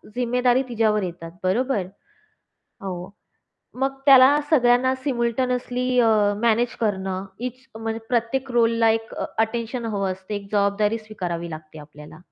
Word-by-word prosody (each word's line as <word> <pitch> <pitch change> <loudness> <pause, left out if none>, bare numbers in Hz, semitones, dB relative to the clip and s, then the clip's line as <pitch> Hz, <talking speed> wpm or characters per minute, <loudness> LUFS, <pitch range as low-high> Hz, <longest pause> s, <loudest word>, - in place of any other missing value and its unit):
जिम्मेदारी 250 +1 +2
तिच्यावर 215 -3 +1
येतात, 170 -2 -6
बरोबर. 210 +1 0 1.0
हो. 180 -2 -5 0.7
मग 270 0 -1
त्याला 260 -2 +5
सायमल्टेनियसली 250 0 0
अ, 230 - +4 0.3
मॅनेज 235 +1 +2
करणं 190 -3 -2 0.2
ईच 255 +2 -12
म्हणजे 225 0 -3
प्रत्येक 250 +2 -1
रोलला 230 -1 +3
एक 225 0 -1
अ, - - -3
अटेन्शन 230 +2 -1
हवं 200 -3 -1
असते 190 +3 -6
एक 200 -1 -6
जबाबदारी 205 +2 +1
स्वीकारावी 180 -6 -5
लागते 155 0 -10
आपल्याला. 150 0 -13
225 Hz, 120 wpm, -23 LUFS, 195-250 Hz, 1.0 s, त्याला